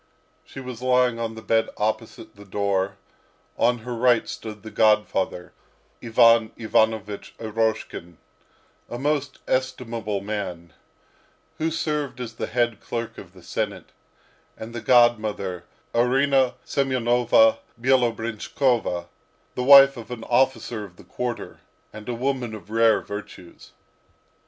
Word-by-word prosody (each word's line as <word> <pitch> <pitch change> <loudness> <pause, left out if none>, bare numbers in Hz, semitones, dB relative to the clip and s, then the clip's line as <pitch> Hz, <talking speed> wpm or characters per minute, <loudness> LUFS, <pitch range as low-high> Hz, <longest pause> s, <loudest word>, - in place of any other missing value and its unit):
She - - -11
was 125 -2 -8
lying 125 -2 +2
on 115 -1 -3
the 110 - -10
bed 115 0 +1
opposite 105 +1 -3
the 100 - -13
door; 100 -1 -1 0.6
on 120 +1 +2
her 125 - -4
right 120 -1 +3
stood 105 -2 -8
the 110 - -9
godfather, 105 -4 +1 0.5
Ivan 115 -1 +5
Ivanovich 110 -2 0
Eroshkin, 110 -6 -3 0.7
a 120 - -5
most 145 +1 -1
estimable 120 -5 -2
man, 95 -5 -5 0.9
who 160 +1 +1
served 150 -5 -2
as 120 -2 -6
the - - -4
head 120 -2 0
clerk 115 -1 -5
of - - -13
the - - -16
senate; - - -4 0.7
and 110 +1 -8
the 120 - -5
godmother, 110 -8 +2 0.3
Arina 130 +2 +3
Semyonovna 130 - +3 0.2
Bielobrinshkova, 115 -4 0 0.5
the 125 - -3
wife 140 0 +8
of 115 - -9
an 120 -2 -6
officer 120 -3 0
of 95 -4 -12
the - - -16
quarter, 120 -4 -5 0.3
and 110 +2 -9
a 120 - -2
woman 125 -2 -2
of 105 0 -12
rare 115 0 +4
virtues. 100 -4 -10
115 Hz, 125 wpm, -24 LUFS, 110-125 Hz, 0.9 s, wife